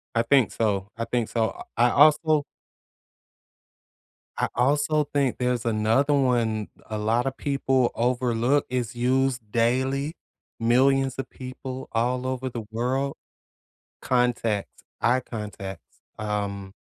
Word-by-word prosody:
I 115 - +3
think 125 -2 +3
so, 100 -3 -1
I 115 - -2
think 120 -2 -1
so, 115 -1 0 0.3
I 120 - +5
I - - -2
also 155 +1 +5 1.9
I - - +1
also 145 +4 +2
think 140 -3 0
there's 125 -2 -1
another 115 +6 +2
one 120 -6 +1 0.2
a 110 - -3
lotta 115 +5 +1
people 135 -2 0
overlook 125 +2 +1
is 125 -2 -2
used 125 -2 0
daily. 130 +6 +1 0.5
Millions 130 +3 +3
of 135 - -4
people 130 0 -7
all 125 +2 0
over 130 0 -2
the 120 -2 -5
world 130 +5 -1 0.9
contacts 120 -5 +1 0.3
eye 120 +3 +3
contacts, 105 -6 -8 0.2
um 100 -2 -3
125 Hz, 115 wpm, -25 LUFS, 115-135 Hz, 1.9 s, I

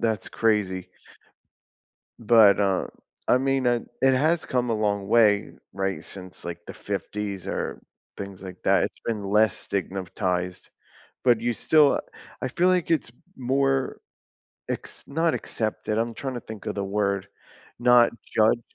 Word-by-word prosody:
that's 110 -2 -1
crazy. 105 -5 0 1.3
But, 110 -3 +6
um, 95 -2 +1 0.4
I - - +6
mean, 135 -1 +1
it 120 -1 +2 0.2
it 135 0 +5
has 155 +5 +2
come 125 -2 0
a - - +2
long 100 -2 0
way, 105 -3 +4 0.2
right, 95 -4 -2
since, 95 +1 -10
like, 85 0 -6
the - - -7
'50s 100 -3 -4
or - - -3 0.3
things 100 -1 -8
like 95 -1 -9
that, - - +4
it's - - -6
been 110 -3 -2
less 105 0 +4
stigmatized, 90 -2 -3 0.5
but 120 -3 +4
you 120 +1 0
still 150 +4 +4 0.4
I - - 0
feel 180 - +1
like 180 -2 +1
it's 155 -7 +1 0.3
more 135 +1 0 0.7
acc - - -3 0.2
not 160 +3 +1
accepted, 110 -1 -2
I'm 115 +1 0
trying 135 0 -5
to - - -3
think 110 -2 -10
of - - -2
the 100 - -2
word. 100 -1 -1 0.5
Not 120 -1 +6 0.2
judged? 110 +2 +4
110 Hz, 145 wpm, -25 LUFS, 100-125 Hz, 1.3 s, But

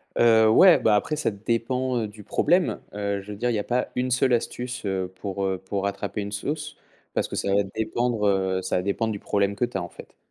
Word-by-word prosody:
Heu, 110 -2 +5
ouais 180 +10 +7
bah, 110 - +3
après 130 +9 0
ça 150 - 0
dépend, 120 +5 -1
heu, 110 - -2
du 105 0 -13
problème. 175 - +1
Heu, 100 -1 -2
je 100 +2 -10
veux 105 - -7
dire 120 +4 0
il - - +1
y - - 0
a - - -2
pas 125 +3 -1
1 125 +1 0
seule 130 +1 +3
astuce, 120 0 -2
heu, 95 -2 -2
pour, 100 -1 -3
heu, 95 -1 0
pour 95 +1 -4
rattraper 100 +1 -3
une 100 0 -5
sauce. 150 +9 -4 0.4
Parce - - 0
que - - -6
ça 100 - 0
va 100 +1 +3
dépendre, 110 +2 -1
heu, 95 -1 +1
ça 95 - -1
va - - +1
dépendre 110 +3 -1
du 100 - -4
problème 100 -1 0
que 120 - +1
tu 120 -5 -5
as - - -2
en 85 - -7
fait. - - -14
105 Hz, 250 wpm, -25 LUFS, 100-120 Hz, 0.4 s, ouais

